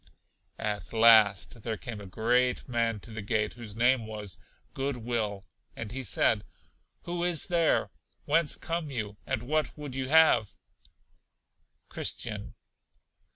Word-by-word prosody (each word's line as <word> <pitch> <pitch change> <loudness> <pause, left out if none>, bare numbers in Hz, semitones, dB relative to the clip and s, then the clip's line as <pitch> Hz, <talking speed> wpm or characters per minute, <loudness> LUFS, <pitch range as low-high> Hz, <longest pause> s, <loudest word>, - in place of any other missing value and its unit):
At 105 +1 -4
last 110 -1 +5
there 110 0 -3
came 110 -3 -7
a 100 - -9
great 125 +6 +1
man 115 -3 0
to 115 - -11
the 110 0 -6
gate, 105 +1 -1
whose 115 -4 -9
name 120 0 +2
was 105 -4 -6 0.3
Good 135 -1 -2
will, 110 -4 -2 0.3
and 110 -2 -6
he 135 +2 -4
said: 110 - +2 0.6
Who 175 0 -3
is 175 -3 +4
there; 170 -3 +1 0.3
whence 165 -4 +3
come 165 -2 -3
you, 105 -6 -5
and 110 - -2
what 155 +5 -1
would 145 -3 -7
you 130 0 -3
have? 155 -9 +4 1.3
Christian. - - -4
115 Hz, 135 wpm, -29 LUFS, 105-135 Hz, 1.3 s, last